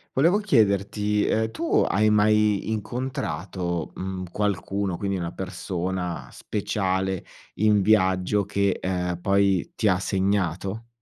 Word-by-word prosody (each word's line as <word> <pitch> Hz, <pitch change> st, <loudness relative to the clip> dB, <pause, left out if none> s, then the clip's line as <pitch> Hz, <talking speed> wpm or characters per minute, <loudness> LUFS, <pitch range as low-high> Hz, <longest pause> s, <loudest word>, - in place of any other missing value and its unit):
Volevo 170 Hz, +9 st, +4 dB
chiederti: 105 Hz, -, +2 dB
Ehm, 110 Hz, 0 st, +1 dB
tu 165 Hz, +9 st, +1 dB
hai 110 Hz, +2 st, +3 dB
mai 105 Hz, 0 st, +3 dB
incontrato, 100 Hz, -, -3 dB
mhmm, 95 Hz, 0 st, -4 dB
qualcuno, 100 Hz, -2 st, -1 dB
quindi 100 Hz, +1 st, -2 dB
una 85 Hz, -2 st, -3 dB
persona 90 Hz, -2 st, -4 dB
speciale, 95 Hz, -2 st, -2 dB, 0.3 s
in 105 Hz, -1 st, +3 dB
viaggio, 95 Hz, -1 st, +3 dB
che, 100 Hz, -1 st, 0 dB
ehm, 90 Hz, -1 st, -2 dB
poi 100 Hz, -2 st, +2 dB
ti 110 Hz, -, +1 dB
ha 95 Hz, -2 st, +3 dB
segnato? 95 Hz, +2 st, -1 dB
100 Hz, 115 wpm, -25 LUFS, 95-105 Hz, 0.3 s, Volevo